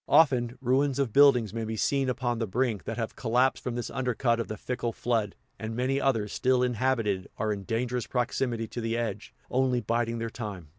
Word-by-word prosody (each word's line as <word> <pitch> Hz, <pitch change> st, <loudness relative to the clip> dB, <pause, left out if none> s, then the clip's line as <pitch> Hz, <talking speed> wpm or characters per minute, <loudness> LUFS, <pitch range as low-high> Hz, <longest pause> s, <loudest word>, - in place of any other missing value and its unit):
Often, 130 Hz, -5 st, +4 dB
ruins 135 Hz, +2 st, +2 dB
of 135 Hz, -6 st, 0 dB
buildings 125 Hz, -7 st, +5 dB
may 115 Hz, 0 st, -2 dB
be 110 Hz, 0 st, -3 dB
seen 135 Hz, +3 st, +1 dB
upon 120 Hz, -2 st, -1 dB
the 115 Hz, -, -1 dB
brink, 115 Hz, 0 st, -1 dB
that 115 Hz, -, -4 dB
have 115 Hz, -2 st, -3 dB
collapsed 125 Hz, +2 st, +1 dB
from 125 Hz, -, -3 dB
this 120 Hz, -, -4 dB
undercut 125 Hz, -2 st, 0 dB
of 115 Hz, -, -2 dB
the 110 Hz, -, -5 dB
fickle 120 Hz, -2 st, -3 dB
flood; 110 Hz, -5 st, -1 dB, 0.2 s
and 110 Hz, 0 st, -4 dB
many 130 Hz, +3 st, 0 dB
others, 115 Hz, -6 st, +1 dB
still 130 Hz, 0 st, +2 dB
inhabited, 120 Hz, -6 st, 0 dB
are 110 Hz, -1 st, 0 dB
in 100 Hz, -1 st, -7 dB
dangerous 120 Hz, +2 st, -1 dB
proximity 120 Hz, -2 st, -1 dB
to 120 Hz, -, -5 dB
the 115 Hz, 0 st, -1 dB
edge, 115 Hz, -2 st, -3 dB, 0.2 s
only 130 Hz, -1 st, +2 dB
biding 115 Hz, +1 st, -1 dB
their 115 Hz, 0 st, -3 dB
time. 100 Hz, -10 st, -6 dB
120 Hz, 200 wpm, -28 LUFS, 115-130 Hz, 0.2 s, buildings